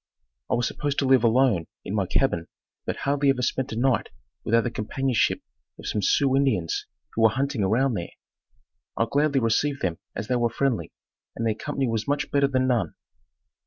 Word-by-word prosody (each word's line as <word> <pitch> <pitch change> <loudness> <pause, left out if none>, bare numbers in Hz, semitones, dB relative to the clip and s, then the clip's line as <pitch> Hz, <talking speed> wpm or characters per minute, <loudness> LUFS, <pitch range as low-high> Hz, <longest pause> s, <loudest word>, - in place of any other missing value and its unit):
I - - +2
was 120 0 +1
supposed 145 -1 -3
to 140 - +2
live 130 -2 +5
alone 115 -7 +3 0.2
in 95 - -4
my 100 -3 0
cabin 85 -11 +1 0.4
but - - -1
hardly 140 0 +1
ever 130 -2 +1
spent 130 +1 -1
a - - -3
night 125 -1 +1 0.3
without 115 +1 +3
the 120 - -2
companionship 125 +2 0 0.3
of - - -11
some 105 - -1
Sioux 135 +6 +3
Indians 110 -12 +1 0.3
who 115 - -1
were 110 - +7
hunting 135 +1 -1
around 120 +7 +2
there. 85 -5 -3 0.9
I 115 - +3
gladly 145 +2 +2
received 130 +5 0
them 90 -1 -1 0.2
as 105 - -4
they 125 - +1
were 120 -1 +2
friendly, 125 0 -1 0.4
and 115 - -2
their 110 - +2
company 140 +3 -2
was 110 -2 -2
much 145 0 -1
better 140 -1 +3
than 130 -1 +1
none. 120 -10 0
125 Hz, 190 wpm, -25 LUFS, 110-135 Hz, 0.9 s, were